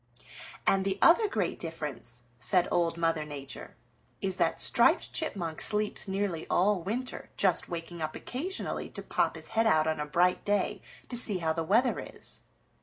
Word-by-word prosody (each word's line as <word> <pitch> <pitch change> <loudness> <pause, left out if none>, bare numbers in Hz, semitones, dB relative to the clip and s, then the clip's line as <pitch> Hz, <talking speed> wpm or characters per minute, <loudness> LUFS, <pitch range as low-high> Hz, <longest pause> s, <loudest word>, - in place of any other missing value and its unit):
"And 195 0 +3
the 195 0 -1
other 420 +6 +6
great 200 - -2
difference," 150 -7 -6 0.2
said 180 +4 +2
Old 170 -1 +1
Mother 165 -2 0
Nature, 140 -2 -9 0.4
"is 190 -1 -2
that - - +1
Striped - - +4
Chipmunk 180 - -2
sleeps 210 0 +3
nearly 190 -4 -2
all 190 +1 +2
winter, 235 +8 -4
just 190 -3 +1
waking 170 0 -6
up 155 0 -3
occasionally 345 +10 -3
to - - -7
pop - - 0
his - - -2
head 225 0 +2
out 155 -7 +4
on 160 -1 -1
a 150 - -3
bright 180 +4 +2
day 205 0 0 0.3
to 245 - -5
see 220 -5 +1
how 160 -2 0
the 165 0 -2
weather 230 +9 +2
is. - - -6
180 Hz, 170 wpm, -29 LUFS, 160-210 Hz, 0.4 s, other